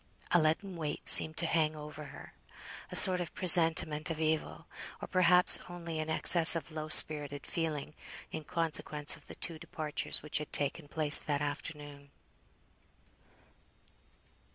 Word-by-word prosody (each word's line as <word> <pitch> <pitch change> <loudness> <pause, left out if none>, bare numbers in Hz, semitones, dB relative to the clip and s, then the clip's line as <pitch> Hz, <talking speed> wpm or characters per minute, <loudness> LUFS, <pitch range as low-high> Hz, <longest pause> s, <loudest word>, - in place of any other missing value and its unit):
A 175 - +2
leaden 170 +4 -4
weight 150 -3 -8
seemed 155 0 +5
to - - -1
hang 160 -2 -2
over 150 0 -11
her; - - -15 0.6
a - - -6
sort 185 -1 +2
of 170 - -10
presentiment 160 -3 +4
of 160 -1 -7
evil, 160 0 -5 0.3
or - - -10
perhaps 180 0 +3
only 170 -2 -9
an 155 0 -7
excess 165 +1 +7
of 165 0 -8
low 155 0 -8
spirited 145 -2 +1
feeling 155 -3 -6 0.4
in 155 - -8
consequence 155 -2 -2
of - - -19
the - - -12
two 165 -3 -4
departures 155 -4 -6
which 150 0 -5
had 150 - -10
taken 145 +2 -3
place 150 0 +4
that 145 -2 -5
afternoon. 145 -1 -9
155 Hz, 145 wpm, -29 LUFS, 150-165 Hz, 0.6 s, excess